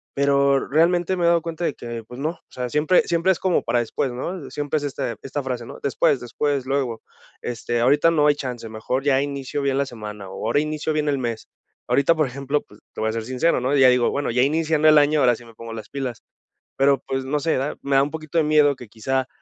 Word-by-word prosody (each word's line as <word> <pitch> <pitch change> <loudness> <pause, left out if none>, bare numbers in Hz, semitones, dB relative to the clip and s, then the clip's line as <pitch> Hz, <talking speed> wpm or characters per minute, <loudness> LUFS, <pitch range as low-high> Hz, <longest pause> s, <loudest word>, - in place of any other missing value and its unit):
Pero 140 0 +2
realmente 175 +4 +2
me 175 - -1
he - - +5
dado 170 -1 +4
cuenta 165 +1 -4
de 145 - 0
que, 120 -1 -7
pues 125 +2 -10
no, 150 - 0
o 165 - -17
sea, 125 -1 -4
siempre 155 +6 +3
siempre 170 +2 +2
es 180 - -1
como 185 -2 +1
para 120 - +1
después, 120 +2 -2
¿no? 145 +5 -5
Siempre 145 +2 -2
es, 145 - -3
este, 135 -4 -3
esta 140 +2 -3
frase, 125 -2 -4
¿no? - - -10
"Después, 140 -1 +2
después, 140 +2 -2
luego, 135 -5 -1 0.4
este, 120 0 -3
ahorita 145 +6 +4
no 150 -3 +3
hay 145 - +4
chance, 125 -5 -6
mejor 110 +5 -3
ya 135 -2 +3
inicio 140 0 -4
bien 135 -1 +1
la 140 - +1
semana, 105 -4 -8
o 95 - -6
ahora 120 +5 +2
inicio 155 0 -2
bien 150 -1 0
el 140 - +1
mes". 115 -3 -4 0.4
Ahorita, 140 +4 +3
por 155 -2 +1
ejemplo, 140 +3 -2
pues, 105 - -19
te - - -6
voy 110 - +1
a - - -2
ser 115 -1 -3
sincero, 130 +7 +1
¿no? 130 +3 +1
ya 130 -2 +7
digo: 125 -1 +3
"Bueno, 145 -2 -2
ya 125 +2 +3
iniciando 155 +1 +2
el 155 - +7
año, 145 0 +3
ahora 125 -2 +4
sí 120 - -14
me 115 - -16
pongo 115 0 -8
las 110 - -8
pilas". 130 -4 -5 0.6
Pero, 135 0 +4
pues, 135 0 -2
no 145 +3 0
sé 160 0 0
da, 135 +3 -2
me 140 -1 0
da 135 - +6
un 145 - -2
poquito 160 +1 -5
de 155 - +2
miedo 150 -2 +4
que, 125 -3 -11
quizá, 130 +4 -2
140 Hz, 250 wpm, -22 LUFS, 125-150 Hz, 0.6 s, ya